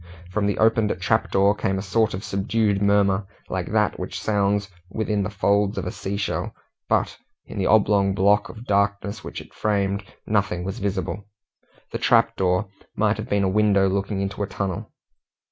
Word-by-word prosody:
From 100 +1 0
the 100 - 0
opened 110 -3 +2
trap 110 +5 +1
door 100 +1 +4
came 95 -2 -1
a 95 - -3
sort 110 +1 +1
of 95 - -6
subdued 100 +1 0
murmur, 100 -1 +3 0.2
like - - -2
that - - +1
which - - -4
sounds 100 -1 +1 0.2
within 105 0 -1
the 100 - -2
folds 100 +1 +1
of 95 - -2
a - - -3
sea 100 +1 -4
shell, 100 - -2 0.3
but, - - +1 0.3
in 105 - -7
the 95 - +1
oblong 100 -2 +3
block 100 +2 +3
of 115 +1 -10
darkness 100 +1 0
which - - -6
it - - -16
framed, 100 -1 0 0.2
nothing 100 -4 0
was 95 +2 -4
visible. 95 0 -3 0.6
The - - -3
trap - - +3
door 90 0 +1 0.3
might 105 0 +2
have 110 - -6
been 100 -1 +2
a - - +2
window 100 0 +3
looking 95 +1 -1
into 100 +1 -3
a 100 - 0
tunnel. 95 -2 -4
100 Hz, 180 wpm, -23 LUFS, 95-105 Hz, 0.6 s, door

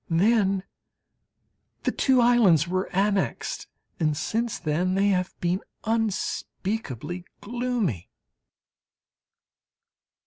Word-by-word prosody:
Then 195 +2 +3 1.2
the - - +1
two 260 -2 +3
islands 215 - +5
were 185 +2 -1
annexed, 195 +1 0 0.3
and 155 -3 +1
since 225 +8 -1
then 175 +4 0
they 200 +1 +3
have 185 -2 -1
been 180 +1 0 0.2
unspeakably 200 - -2 0.2
gloomy! 235 - -2
195 Hz, 80 wpm, -26 LUFS, 175-225 Hz, 1.2 s, islands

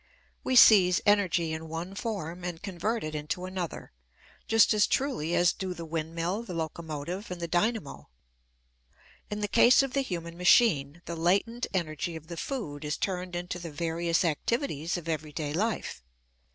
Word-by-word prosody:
We 260 - 0
seize 185 -7 +8
energy 185 -6 +2
in 160 0 -6
one 165 +4 -5
form 180 -5 -4
and 175 -1 -5
convert 205 +4 -2
it 155 0 -4
into 150 +4 -3
another, 185 -2 -5 0.6
just 225 0 +5
as 210 -1 +4
truly 250 - 0
as 175 0 +4
do 185 -2 -5
the 170 - -7
windmill, 165 +5 -2
the 190 -7 -7
locomotive, 165 +3 -5
and 180 -1 -5
the 170 - -3
dynamo. 180 0 -1 1.2
In 210 0 -4
the 205 - 0
case 240 +5 +6
of 270 -2 -4
the 275 - +2
human 170 -8 -5
machine, 170 - +4
the 170 - -5
latent 195 +8 +1
energy 165 -2 -2
of 160 +1 -10
the 170 - -6
food 160 - -4
is 150 0 -2
turned 180 -2 -3
into 175 0 -4
the 170 -1 -6
various 170 +3 0
activities 170 - -1
of 170 -2 -8
everyday 155 -2 -3
life. 215 - -2
175 Hz, 165 wpm, -28 LUFS, 160-205 Hz, 1.2 s, seize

